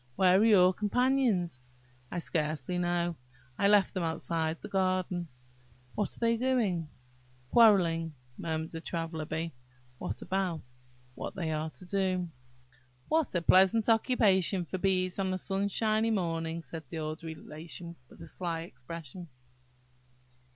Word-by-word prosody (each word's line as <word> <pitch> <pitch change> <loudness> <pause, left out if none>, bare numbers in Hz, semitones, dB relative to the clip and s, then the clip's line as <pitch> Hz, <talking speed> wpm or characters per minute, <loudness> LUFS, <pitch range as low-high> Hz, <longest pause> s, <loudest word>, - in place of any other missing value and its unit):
"Where 185 0 +5
are - - +5
your 190 -5 +6
companions?" 210 - +1 0.5
"I - - -5
scarcely 160 0 -1
know; 175 -1 0 0.4
I 200 - +4
left 205 -2 +4
them 185 - -2
outside 160 0 -1
the - - -8
garden." 185 -2 0 0.7
"What 205 - -2
are - - -14
they 230 0 +2
doing?" 220 -11 +1 0.3
"... 125 0 -31
Quarrelling... 170 -8 +5
" 125 0 -31
murmured 160 0 -3
the 165 - -6
Traveller 165 -2 -3
bee. 160 +1 -3 0.5
"What - - -4
about?" 180 -8 -2 0.4
"What - - -6
they 165 -3 -2
are 155 +1 -2
to 180 - -14
do." 185 -2 0 0.8
"What 315 -9 +1
a 170 - +1
pleasant 190 +6 +5
occupation 205 -6 +3
for 185 - -4
bees 185 -1 +1
on 190 -1 0
a - - -1
sunshiny 215 +4 +1
morning!" 165 -5 -1
said 160 -3 -8
the 165 - -6
old 155 0 -4
Relation, 165 +1 -8
with - - -13
a - - -10
sly 165 0 -3
expression. 165 +4 -9
175 Hz, 145 wpm, -30 LUFS, 165-195 Hz, 0.8 s, your